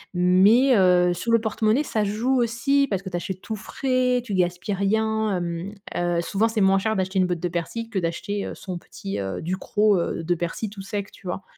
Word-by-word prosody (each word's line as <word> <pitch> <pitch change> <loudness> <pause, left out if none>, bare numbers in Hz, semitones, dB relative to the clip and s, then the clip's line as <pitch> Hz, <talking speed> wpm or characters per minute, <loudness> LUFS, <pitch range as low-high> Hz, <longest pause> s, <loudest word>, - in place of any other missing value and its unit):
Mais, 200 +9 +5
heu, 180 -2 +4
sur 205 +7 -3
le 230 - +5
porte-monnaie, 220 +4 +1
ça 220 -7 -1
joue 235 +6 +1
aussi 240 +5 +2
parce 195 -2 -2
que 190 - -5
tu - - -4
achètes 185 +1 -5
tout 220 - -4
frais, 250 +4 0
tu 210 - -4
gaspilles 180 +2 0
rien, 220 +1 +1
hem. 175 +3 -4 0.2
Heu, 175 -1 0
souvent 200 +5 +1
c'est 225 -1 -2
moins 195 0 +4
cher 220 +3 0
d'acheter 190 0 0
une 185 - +3
botte 175 -1 -2
de 175 - -1
persil, 200 +7 -4
que 195 - 0
d'acheter, 190 +4 -3
heu, - - -6
son 180 -3 -6
petit, 195 +3 -6
heu, 95 -2 -4
Ducros, 200 +4 +1
heu, 170 0 -2
de 175 +2 +1
persil 175 +5 -4
tout 200 -2 -8
sec, 200 0 -5
tu 190 - -13
vois? 180 +2 -4
195 Hz, 220 wpm, -24 LUFS, 180-220 Hz, 0.2 s, Mais